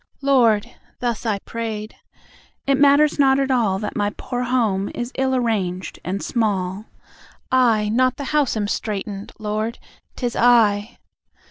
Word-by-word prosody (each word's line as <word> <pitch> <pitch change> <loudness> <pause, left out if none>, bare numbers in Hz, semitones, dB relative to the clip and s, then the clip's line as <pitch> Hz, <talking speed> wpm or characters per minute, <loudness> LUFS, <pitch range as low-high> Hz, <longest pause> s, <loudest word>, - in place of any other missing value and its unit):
"Lord" 235 -6 +3 0.3
(thus 235 -2 -2
I 210 -2 +1
prayed), 220 0 -5 0.7
"it 275 -1 +2
matters 290 +1 +4
not 270 -1 +4
at 270 -1 0
all 220 -7 +2
That 210 +1 -5
my 205 -2 +1
poor 245 -1 -4
home 220 -6 0
is 240 +1 -4
ill 265 0 +1
arranged 195 -7 -2
and 190 +2 -3
small: 200 -3 -1 0.7
I, 235 -5 +3
not 255 +3 +2
the 285 - -5
house, 290 -6 +2
am 205 -1 -1
straitened; 205 -1 -4
Lord, 215 +1 -3 0.4
'tis 245 -2 -3
I! 230 -2 +3
230 Hz, 140 wpm, -21 LUFS, 205-255 Hz, 0.7 s, matters